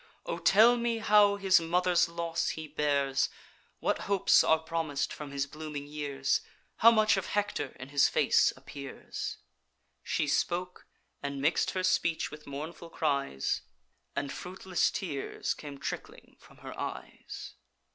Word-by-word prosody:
O - - -3
tell 230 +5 +6
me 235 -1 0
how 210 -2 +5
his 195 -3 +4
mother's 175 +1 +2
loss 170 0 -2
he 160 -1 -5
bears, 140 -2 +1 0.5
What - - 0
hopes 200 -2 +5
are 160 - +4
promis'd 160 -3 -2
from 150 -1 -7
his 140 0 -1
blooming 150 0 -7
years, 145 -2 -1 0.4
How 230 - +8
much 215 -3 +4
of 190 - -2
Hector 205 -9 -2
in 125 +1 -8
his 140 -1 +4
face - - +4
appears?' 140 -2 -7 0.6
She - - -1
spoke; 180 +1 -1 0.3
and 140 -1 -4
mix'd 150 +5 +2
her 185 - 0
speech 170 -3 +1
with 150 0 -11
mournful 155 +4 -7
cries, 140 - -1 0.5
And 140 -1 -2
fruitless 185 0 -1
tears 150 -8 -3
came 145 -2 -9
trickling - - -7
from - - -19
her - - -7
eyes. - - -7
160 Hz, 140 wpm, -30 LUFS, 140-185 Hz, 0.6 s, How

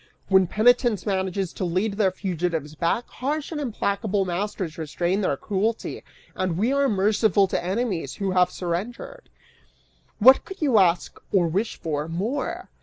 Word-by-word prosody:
When 190 -2 +5
penitence 235 0 +3
manages 190 -2 -1
to - - -5
lead 185 +4 0
their 200 -1 +2
fugitives 175 -5 -3
back, 170 +9 -1
harsh 290 +4 -3
and 300 -2 -3
implacable 205 -5 -1
masters 180 -2 -3
restrain 175 +5 -1
their 145 -8 0
cruelty, 215 +6 -2 0.3
and 185 -3 -2
we 230 +8 +1
are 280 -1 +2
merciful 205 -1 +3
to - - -1
enemies 185 - -2
who 195 -2 -2
have 180 -1 +3
surrendered. 210 - -5 0.9
What 260 +5 +7
could 385 - -10
you 270 -9 +3
ask, 175 -2 +1
or 180 -4 +3
wish 195 +7 -1
for, 150 -1 -3
more? 205 - -3
195 Hz, 150 wpm, -24 LUFS, 175-225 Hz, 0.9 s, What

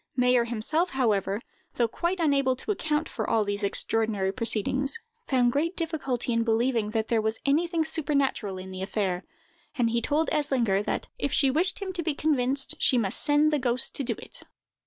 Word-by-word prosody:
Mayer 250 -1 +3
himself, 245 +10 0
however, 210 -5 0 0.3
though 235 - +2
quite 345 +10 -2
unable 275 -5 +2
to 270 - -4
account 315 -5 -1
for - - -4
all 220 -2 +2
these 205 +1 -2
extraordinary 205 -1 0
proceedings, 245 - 0 0.3
found 245 -3 +3
great 330 +7 -1
difficulty 275 -8 -2
in 230 - +2
believing 230 -1 +1
that 220 0 -1
there 230 -2 +2
was 220 +1 -1
anything 325 +3 +1
supernatural 280 - -1
in 185 0 -8
the 185 0 -6
affair; 190 -2 -2 0.5
and 235 -3 +2
he 235 0 0
told 300 +6 0
Eslinger 255 -10 +1
that, - - -3
if 280 - -1
she 275 -3 +3
wished 360 +7 +1
him 380 -1 -4
to 350 - -3
be 315 -3 -1
convinced, 275 -3 +1
she 255 - +4
must 200 -5 +1
send 300 +1 +3
the 295 - +2
ghost 250 0 +3
to 280 - -2
do 235 -2 -1
it! - - -11
255 Hz, 185 wpm, -27 LUFS, 220-300 Hz, 0.5 s, she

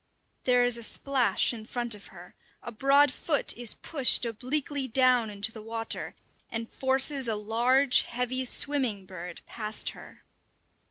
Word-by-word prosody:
There 250 -1 +4
is 245 -1 +3
a - - -7
splash 255 +1 +1
in 220 -2 -9
front 240 -2 -1
of 205 -1 -7
her, - - -14 0.3
a 240 - -7
broad 275 +4 +4
foot 290 +3 0
is 240 -2 -3
pushed 270 -5 +2
obliquely 265 +4 -2
down 250 -2 +3
into 205 +1 -1
the 220 - -10
water 225 +1 -4 0.3
and 225 0 -4
forces 265 +1 +1
a 220 - 0
large, 240 +6 +3
heavy 250 +2 -2
"swimming 250 -7 -1
bird" 180 -2 -9
past 215 -2 -1
her. - - -15
245 Hz, 150 wpm, -28 LUFS, 225-265 Hz, 0.3 s, There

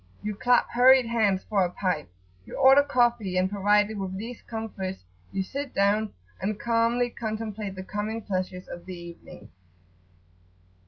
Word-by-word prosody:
You 210 0 -2
clap 245 +4 +3
hurried 255 +1 +6
hands[FN#9] 215 -5 +1
for 200 -3 +2
a 180 - 0
pipe; 175 - -2 0.3
you - - -10
order 270 +1 +7
coffee; 240 -8 +1
and 185 0 +3
provided 205 +1 +2
with 190 -1 -4
these 230 +4 -7
comforts, 200 -4 -5 0.3
you 195 - -1
sit 280 +6 -6
down, 205 +2 +2 0.3
and 210 +2 -2
calmly 235 +1 +1
contemplate 215 -3 -4
the 185 - -6
coming 210 +3 -4
pleasures 185 -2 -3
of 175 - -9
the 185 -1 -6
evening. 170 -11 -12
210 Hz, 150 wpm, -26 LUFS, 190-235 Hz, 0.3 s, order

